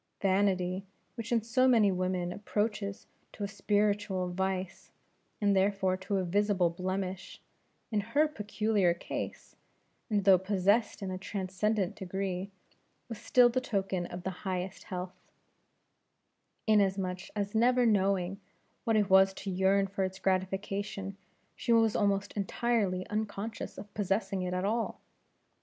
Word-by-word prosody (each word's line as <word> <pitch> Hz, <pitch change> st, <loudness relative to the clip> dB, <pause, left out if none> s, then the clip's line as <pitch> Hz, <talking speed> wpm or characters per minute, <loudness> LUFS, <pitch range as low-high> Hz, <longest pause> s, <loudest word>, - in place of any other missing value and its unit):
Vanity, 190 Hz, -1 st, +1 dB, 0.3 s
which 230 Hz, -1 st, -6 dB
in 230 Hz, -2 st, +2 dB
so 255 Hz, +3 st, +3 dB
many 225 Hz, -6 st, +5 dB
women 185 Hz, -1 st, -1 dB
approaches 205 Hz, -1 st, -2 dB, 0.3 s
to 205 Hz, -, -6 dB
a -, -, 0 dB
spiritual 205 Hz, -2 st, 0 dB
vice, 190 Hz, 0 st, -3 dB, 0.5 s
and 205 Hz, -1 st, +3 dB
therefore 190 Hz, -1 st, +2 dB
to 190 Hz, +2 st, -2 dB
a 190 Hz, -, 0 dB
visible 190 Hz, -1 st, +2 dB
blemish; 185 Hz, +1 st, -4 dB, 0.5 s
in 215 Hz, -, +2 dB
her 285 Hz, +9 st, +2 dB
peculiar 210 Hz, -, +1 dB
case -, -, -6 dB, 0.5 s
and 205 Hz, -2 st, +1 dB
though 190 Hz, -2 st, +7 dB
possessed 200 Hz, +3 st, +1 dB
in 190 Hz, -, -3 dB
a 185 Hz, -, -4 dB
transcendent 195 Hz, +1 st, -1 dB
degree 190 Hz, 0 st, -3 dB, 0.6 s
was 230 Hz, -, -6 dB
still 250 Hz, -1 st, +5 dB
the 250 Hz, +2 st, 0 dB
token 195 Hz, -6 st, -1 dB
of 175 Hz, 0 st, -7 dB
the 190 Hz, -, -2 dB
highest 185 Hz, -1 st, -4 dB
health; 180 Hz, -1 st, -5 dB, 1.5 s
inasmuch 195 Hz, -3 st, +1 dB
as 205 Hz, -1 st, -2 dB
never 245 Hz, +2 st, +4 dB
knowing 195 Hz, -2 st, +1 dB, 0.4 s
what 225 Hz, -2 st, +2 dB
it 205 Hz, -2 st, +3 dB
was 190 Hz, 0 st, +5 dB
to 195 Hz, -, -5 dB
yearn 190 Hz, +2 st, +3 dB
for 195 Hz, 0 st, -2 dB
its 190 Hz, 0 st, -3 dB
gratification, 195 Hz, +1 st, -2 dB, 0.4 s
she -, -, -2 dB
was 225 Hz, -2 st, +4 dB
almost 200 Hz, -1 st, +1 dB
entirely 200 Hz, -2 st, 0 dB
unconscious 215 Hz, +1 st, -4 dB
of 205 Hz, -, -10 dB
possessing 195 Hz, -1 st, -1 dB
it 180 Hz, 0 st, -2 dB
at 180 Hz, +1 st, -1 dB
all. 225 Hz, +3 st, -1 dB
195 Hz, 135 wpm, -31 LUFS, 185-210 Hz, 1.5 s, though